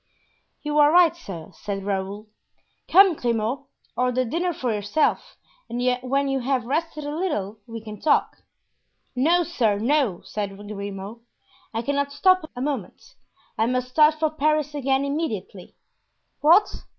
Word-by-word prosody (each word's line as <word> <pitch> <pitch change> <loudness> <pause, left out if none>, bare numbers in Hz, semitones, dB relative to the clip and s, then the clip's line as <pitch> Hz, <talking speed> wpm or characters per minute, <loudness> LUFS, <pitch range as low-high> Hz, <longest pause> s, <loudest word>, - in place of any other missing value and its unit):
"You 300 0 0
are 295 0 +6
right, 340 -1 +5
sir," 185 - -9
said 195 -1 -5
Raoul. 200 +1 -3 0.6
"Come, 385 0 +7
Grimaud, 240 0 -2 0.3
order 250 0 +1
dinner 345 +9 -1
for 255 -7 -2
yourself 205 +9 0 0.3
and 240 - -4 0.2
when 275 +2 0
you 270 0 0
have 255 -1 -1
rested 305 +3 -2
a 290 +1 -4
little 220 - -2
we 230 -1 -7
can 215 -1 -9
talk." 310 - +2 0.8
"No, 335 +8 +3
sir, 235 -12 0
no," 240 - +1
said 200 -2 -5
Grimaud. 205 +1 -7 0.5
"I 225 +1 -3
cannot 280 +2 -1
stop 330 +3 +3
a 245 - -5
moment; 265 -9 -5 0.5
I 225 - +3
must 250 0 -1
start 305 +3 +5
for 310 0 0
Paris 305 -1 0
again 275 -1 0
immediately." 255 - -4 0.6
"What? 345 +8 +4
265 Hz, 140 wpm, -24 LUFS, 215-305 Hz, 0.8 s, Come